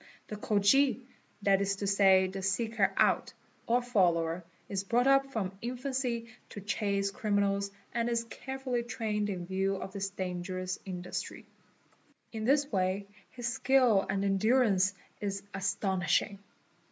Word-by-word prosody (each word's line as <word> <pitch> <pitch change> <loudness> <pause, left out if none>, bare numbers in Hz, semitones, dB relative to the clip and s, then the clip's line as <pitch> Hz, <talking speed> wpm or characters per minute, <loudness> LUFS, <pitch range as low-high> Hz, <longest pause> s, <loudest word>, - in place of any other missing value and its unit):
The 210 - -4
Khoji—that 210 -2 +1
is 200 0 0
to 200 - -4
say 195 -1 +5
the 190 +1 -5
seeker 195 +1 +1
out, - - +2 0.3
01 240 +1 +2
follower—is 180 -3 0
brought 240 +5 +2
up 275 0 +4
from 195 -6 -3
infancy 250 -1 -2 0.2
to - - -8
chase 200 -1 -1
criminals 200 -1 0 0.2
and 235 0 0
is 235 -1 0
careful 265 +2 -6
Vv 240 -1 0
trained 215 -3 -1
in 180 -3 -4
view 195 +1 0
of 190 0 -6
this 195 -1 -2
dangerous 185 0 -4
industry. 180 -2 -5 0.9
In 220 -1 -4
this 285 +3 +4
way 190 0 0 0.2
his 245 -1 -5
skill 250 -7 +4
an 195 0 0
endurance 200 -1 +3 0.2
is 200 -1 -3
astonishing. 195 0 0
200 Hz, 130 wpm, -31 LUFS, 190-235 Hz, 0.9 s, say